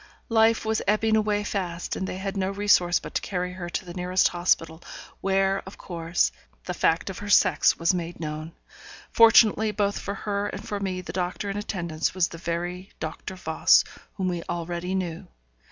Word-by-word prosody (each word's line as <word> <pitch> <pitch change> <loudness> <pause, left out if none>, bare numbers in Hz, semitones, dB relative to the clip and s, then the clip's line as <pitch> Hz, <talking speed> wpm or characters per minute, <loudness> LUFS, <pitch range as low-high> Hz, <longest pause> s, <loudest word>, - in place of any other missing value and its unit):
Life 225 0 +3
was 220 0 0
ebbing 220 +2 +3
away 210 -1 +1
fast, 180 -4 -3
and 190 - -3
they 185 - -4
had 195 +1 -4
no 190 -1 0
resource 195 -3 +3
but - - -9
to - - 0
carry 180 -1 -3
her 180 -1 -6
to 180 - -3
the 175 - -8
nearest 180 +1 +2
hospital, 170 -2 0 0.4
where, 195 0 +1
of 190 - -10
course, 170 -1 -1 0.3
the - - -3
fact 165 +4 +1
of 185 - -9
her 205 - -7
sex 185 -5 +4
was 165 +2 +2
made 175 -1 -4
known. 155 0 -5 0.6
Fortunately 225 -1 +6
both 205 -1 0
for 200 - -4
her 205 0 -2
and - - -7
for 205 - -3
me, 185 -2 -3
the 180 - -8
doctor 185 +2 -2
in 195 - -4
attendance 175 -6 -2
was 180 -2 +2
the 165 - -9
very 175 +3 -4
Doctor 160 +4 -6
Voss 160 -3 +4 0.3
whom 190 -3 -2
we 175 -2 -2
already 175 +2 -3
knew. 175 -3 -3
185 Hz, 185 wpm, -26 LUFS, 175-205 Hz, 0.6 s, Fortunately